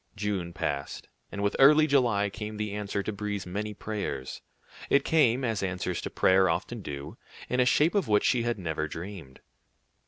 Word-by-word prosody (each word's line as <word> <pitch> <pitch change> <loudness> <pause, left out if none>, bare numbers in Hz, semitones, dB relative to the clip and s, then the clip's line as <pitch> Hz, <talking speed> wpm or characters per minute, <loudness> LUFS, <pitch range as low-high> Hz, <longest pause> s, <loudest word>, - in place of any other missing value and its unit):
June 100 -4 -2
passed, 70 -4 -4 0.2
and 100 - -4
with 100 - 0
early 150 +3 +7
July 120 -9 +2
came 105 +2 -6
the 105 -1 -3
answer 100 -1 -3
to 110 - -3
Brie's 100 -2 -4
many 105 +4 -4
prayers. 100 -12 -5 0.5
It 140 0 +3
came, 135 -5 +3
as 115 -5 -1
answers 90 -2 -2
to - - -4
prayer 95 0 +3
often 85 - -2
do, 70 -1 -7 0.3
in 125 - 0
a 125 - +5
shape 150 +6 +3
of 200 -3 +1
which 105 -1 +3
she 125 - +3
had 120 0 -1
never 80 -4 -3
dreamed. 85 -5 -9
105 Hz, 180 wpm, -28 LUFS, 90-115 Hz, 0.5 s, early